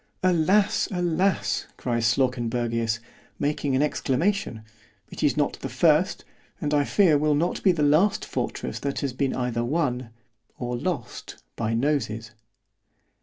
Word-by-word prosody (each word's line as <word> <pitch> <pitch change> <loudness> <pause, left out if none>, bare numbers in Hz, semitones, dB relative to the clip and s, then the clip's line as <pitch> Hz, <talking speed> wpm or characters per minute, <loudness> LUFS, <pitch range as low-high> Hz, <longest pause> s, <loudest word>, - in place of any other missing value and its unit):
Alas! 185 +3 +3
alas! 180 +1 0
cries 120 -2 0
Slawkenbergius, 120 -2 0 0.4
making 145 -1 -1
an 135 - +3
exclamation—it 130 - -3
is - - +2
not - - 0
the - - -5
first——and 150 0 0
I 145 -1 +4
fear 165 -6 +4
will 150 0 +2
not 170 +4 0
be 190 - +5
the 160 -4 0
last 155 +8 +3
fortress 65 - -4
that 140 -1 -3
has 140 -3 -2
been 135 +1 -1
either 120 -2 -1
won——or 120 -4 -4
lost 140 -2 -5
by 115 0 -1
NOSES. 115 -5 -1
135 Hz, 125 wpm, -25 LUFS, 115-160 Hz, 0.4 s, be